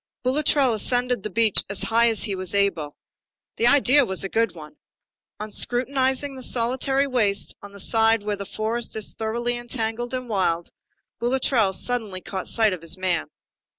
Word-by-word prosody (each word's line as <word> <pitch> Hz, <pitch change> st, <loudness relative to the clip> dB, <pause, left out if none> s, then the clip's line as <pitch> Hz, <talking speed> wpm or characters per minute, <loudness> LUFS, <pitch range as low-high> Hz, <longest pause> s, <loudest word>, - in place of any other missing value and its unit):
Boulatruelle 270 Hz, -1 st, +2 dB
ascended 245 Hz, +2 st, +1 dB
the 215 Hz, -, -5 dB
beech 220 Hz, +1 st, +3 dB
as 200 Hz, -, -1 dB
high 235 Hz, +1 st, +3 dB
as 225 Hz, -, +1 dB
he 205 Hz, -, -2 dB
was 185 Hz, 0 st, -5 dB
able. 175 Hz, -8 st, 0 dB, 0.6 s
The 235 Hz, -, +3 dB
idea 280 Hz, +1 st, +5 dB
was 190 Hz, -6 st, -2 dB
a 195 Hz, -, -3 dB
good 225 Hz, -4 st, 0 dB
one. 150 Hz, -2 st, -12 dB, 0.6 s
On 215 Hz, 0 st, -6 dB
scrutinizing 265 Hz, +4 st, 0 dB
the 260 Hz, -, -8 dB
solitary 260 Hz, +3 st, +1 dB
waste 220 Hz, -7 st, 0 dB
on 200 Hz, -, -11 dB
the 200 Hz, -, -12 dB
side 225 Hz, +1 st, +2 dB
where 210 Hz, 0 st, -2 dB
the 200 Hz, -1 st, -7 dB
forest 225 Hz, +2 st, -3 dB
is 215 Hz, -2 st, -2 dB
thoroughly 235 Hz, +2 st, -2 dB
entangled 240 Hz, 0 st, -3 dB
and 255 Hz, -1 st, -5 dB
wild, 175 Hz, -6 st, -1 dB, 0.5 s
Boulatruelle 240 Hz, -4 st, +1 dB
suddenly 225 Hz, -7 st, -2 dB
caught 190 Hz, +1 st, -6 dB
sight 220 Hz, -4 st, +2 dB
of 180 Hz, -, -6 dB
his 165 Hz, +2 st, -3 dB
man. 180 Hz, -3 st, 0 dB
225 Hz, 170 wpm, -23 LUFS, 200-250 Hz, 0.6 s, idea